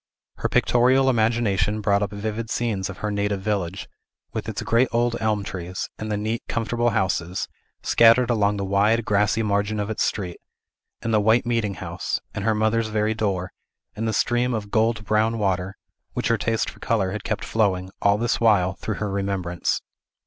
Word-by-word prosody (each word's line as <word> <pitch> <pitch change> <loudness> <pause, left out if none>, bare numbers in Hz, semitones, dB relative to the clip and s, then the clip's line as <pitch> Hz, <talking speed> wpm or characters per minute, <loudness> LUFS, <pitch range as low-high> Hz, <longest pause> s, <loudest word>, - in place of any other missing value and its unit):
Her - - -1
pictorial 130 +2 +4
imagination 110 -3 +1
brought 100 -1 +2
up 105 - 0
vivid 110 +2 -4
scenes 105 -6 -1
of 100 - -7
her 105 - -1
native 100 -1 -1
village, 100 -3 -2 0.5
with - - -3
its - - -4
great 120 +3 +3
old 120 0 +1
elm 110 -2 +1
trees; 90 -1 -5
and 110 0 -4
the 105 - 0
neat, 110 +3 -2
comfortable 120 +1 0
houses, 95 -3 -1 0.4
scattered 115 +1 +5
along 105 -2 +2
the 100 - -2
wide, 105 +4 +2
grassy 105 +2 +2
margin 105 0 0
of 105 +1 -2
its 110 - -3
street, 90 -5 -2 0.6
and 115 - -1
the 105 - +4
white 110 +3 +3
meeting 115 -4 0
house, - - -3
and 100 - -4
her 110 -1 +2
mother's 110 +1 +1
very 110 0 0
door, 95 -5 -2 0.4
and 115 +1 -2
the - - +1
stream 120 +2 +1
of 105 -2 -5
gold 110 -1 +1
brown 110 +2 +2
water, 95 -2 -1 0.4
which - - -1
her 115 - +3
taste 115 +1 0
for - - -18
color 100 -5 0
had 105 - -5
kept 110 - -2
flowing, 95 -4 0
all 100 0 +4
this 120 +2 0
while, 100 -5 +4
through 105 +4 -4
her 105 0 -3
remembrance. 95 -3 -1
105 Hz, 185 wpm, -24 LUFS, 100-115 Hz, 0.6 s, scattered